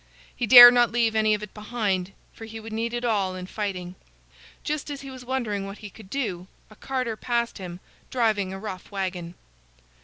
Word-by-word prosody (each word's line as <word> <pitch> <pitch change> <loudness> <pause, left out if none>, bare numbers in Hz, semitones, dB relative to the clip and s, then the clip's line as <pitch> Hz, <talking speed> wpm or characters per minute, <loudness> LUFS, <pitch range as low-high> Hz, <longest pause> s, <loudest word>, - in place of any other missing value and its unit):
He 240 - -2
dared 245 +1 +12
not 240 -1 +3
leave 230 -1 +1
any 215 -1 +3
of 210 - -7
it 210 - -9
behind, 210 -4 -2 0.2
for 225 - -10
he 225 0 -9
would 220 0 -9
need 230 +1 -2
it 240 0 -3
all 200 -5 0
in 185 0 -6
fighting. 185 -3 -5 0.7
Just 300 -1 -3
as 285 -1 -6
he 275 -1 -9
was 255 -1 -10
wondering 230 -6 -3
what 195 +1 -8
he 205 -2 -10
could 210 -2 -15
do, 195 -9 -3 0.2
a - - -14
carter 255 -2 -3
passed 235 0 -2
him, 180 -2 -8 0.3
driving 215 -6 0
a 190 - -6
rough 195 -3 -8
wagon. 180 -3 -4
215 Hz, 195 wpm, -25 LUFS, 195-240 Hz, 0.7 s, dared